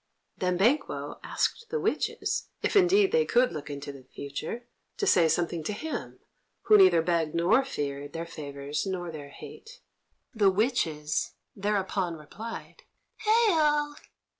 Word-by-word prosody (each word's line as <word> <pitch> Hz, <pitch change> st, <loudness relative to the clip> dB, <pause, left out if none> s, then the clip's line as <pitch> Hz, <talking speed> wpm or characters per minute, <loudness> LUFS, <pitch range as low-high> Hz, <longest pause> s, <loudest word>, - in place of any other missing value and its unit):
Then 180 Hz, -1 st, +1 dB
Banquo 235 Hz, +11 st, +1 dB
asked 465 Hz, -, -1 dB
the 465 Hz, -, -1 dB
witches, -, -, -1 dB, 0.2 s
if -, -, 0 dB
indeed 390 Hz, +1 st, +5 dB
they 475 Hz, 0 st, +4 dB
could 250 Hz, -, +3 dB
look 150 Hz, -1 st, -6 dB
into 140 Hz, 0 st, -6 dB
the 140 Hz, -1 st, -12 dB
future, 145 Hz, -, -6 dB, 0.3 s
to 410 Hz, -, 0 dB
say 175 Hz, -, +5 dB
something 170 Hz, -1 st, 0 dB
to 210 Hz, -, -1 dB
him, 310 Hz, +9 st, -5 dB, 0.5 s
who 430 Hz, -, +6 dB
neither 375 Hz, -, +6 dB
begged 165 Hz, -2 st, 0 dB
nor 185 Hz, +10 st, +4 dB
feared 145 Hz, -, -4 dB
their 165 Hz, +1 st, -4 dB
favours 145 Hz, -1 st, -5 dB
nor 175 Hz, -3 st, -3 dB
their 145 Hz, -3 st, -8 dB
hate. 455 Hz, -, -12 dB, 0.5 s
The 210 Hz, -4 st, +4 dB
witches 185 Hz, -, 0 dB, 0.2 s
thereupon 195 Hz, -3 st, -1 dB
replied: 225 Hz, -, -9 dB, 0.4 s
"Hail!" 325 Hz, -10 st, +3 dB
190 Hz, 140 wpm, -28 LUFS, -, 0.5 s, who